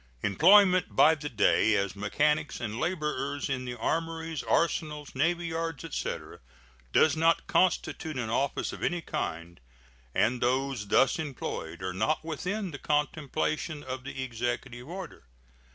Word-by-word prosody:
Employment 185 - +5
by 160 - +7
the 150 -2 -5
day 110 -2 +3
as 100 -1 0
mechanics 145 +9 0
and 110 0 -4
laborers 145 -5 -2
in 130 -1 -2
the 125 -1 -5
armories, 165 +3 -2
arsenals, 150 -3 0
navy 170 +5 +1
yards, 165 -2 -3
etc., 165 - -5 0.5
does 155 - +4
not 165 +1 +3
constitute 160 -4 +1
an 115 -3 -2
office 135 +4 -1
of - - -8
any 175 -1 0
kind, 85 +2 -4 0.6
and 120 +3 +2
those 130 -3 0
thus 135 - +3
employed 95 - -5
are 95 -1 -2
not 150 - 0
within 185 +5 -3
the 145 - -7
contemplation 150 +1 -1
of 130 -1 -5
the 135 0 -5
Executive 120 +1 -4
order. 180 - -8
145 Hz, 135 wpm, -29 LUFS, 120-165 Hz, 0.6 s, by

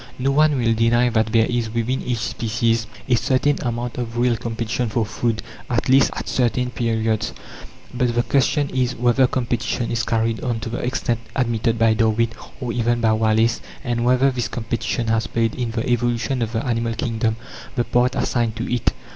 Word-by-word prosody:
No 135 +2 +1
one 150 0 +4
will 115 -2 +2
deny 120 +2 +3
that 110 -1 +1
there 115 -1 +4
is, 120 -2 -1
within 115 +3 -1
each 125 -1 -2
species, 115 +1 0 0.2
a 125 - +2
certain 130 +4 +2
amount 120 0 -3
of 120 -1 -4
real 120 0 +3
competition 115 +1 -2
for 110 +1 0
food 115 +1 -2 0.3
at 120 0 0
least, 135 +1 +6
at - - -5
certain 125 0 0
periods. 110 -2 -1 0.6
But 125 -2 0
the 120 - +2
question 140 +2 +1
is, 125 -1 0
whether 125 +2 +3
competition 120 -1 -1
is 115 - 0
carried 115 -2 0
on 120 -3 -1
to 115 - -4
the 120 - -3
extent 120 -2 -1 0.2
admitted 115 -2 0
by 115 -1 +4
Darwin, 110 +1 +2 0.3
or 120 -2 -3
even 120 0 +1
by 110 -2 +3
Wallace; 110 +1 +2 0.2
and 120 -3 -1
whether 130 +2 +4
this 125 -2 -2
competition 115 0 -2
has 110 0 +1
played, 115 -1 0
in 125 -3 -2
the 115 0 -3
evolution 120 0 0
of 115 -1 -1
the 115 +1 -2
animal 115 -1 -1
kingdom, 115 -1 -1 0.4
the 120 - +2
part 125 +2 +1
assigned 120 -4 0
to 120 +2 -3
it. 120 - +1
120 Hz, 190 wpm, -21 LUFS, 115-125 Hz, 0.6 s, least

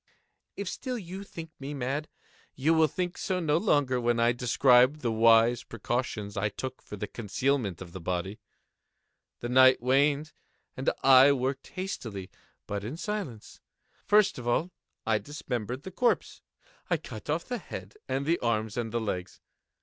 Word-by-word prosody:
If 200 - -4
still 255 +5 -4
you 190 -1 -7
think 165 -4 -9
me 140 +2 -5
mad, 140 +3 -2 0.5
you 155 +5 +2
will 160 -1 +5
think 180 +4 -3
so 185 -1 -1
no 155 -3 +2
longer 145 - +2
when 120 0 +1
I 115 +1 +4
describe 125 +3 +4
the 120 - 0
wise 115 +1 +5
precautions 115 -2 -3
I 105 +1 0
took 130 +5 -6
for 105 - -9
the 105 - -3
concealment 110 - -1
of 85 - -13
the 95 - -8
body. 95 +4 -3 1.0
The 120 - -3
night 130 +1 +6
waned, 140 +4 +2 0.4
and 130 - 0
I 135 +1 +8
worked 135 0 -2
hastily, 115 - -5 0.3
but 100 0 -4
in 125 +9 -5
silence. 180 - -5 0.4
First 210 -8 +4
of 120 - -7
all 160 +9 +1 0.3
I 110 -1 +2
dismembered 125 0 -5
the 190 - -7
corpse. 240 +6 0 0.5
I - - +3
cut - - -10
off - - 0
the - - -3
head - - -8 0.2
and 135 +1 -1
the 165 +3 +2
arms 110 -2 -1
and 115 -2 -2
the 120 - 0
legs. 95 -5 -4
130 Hz, 165 wpm, -29 LUFS, 115-150 Hz, 1.0 s, I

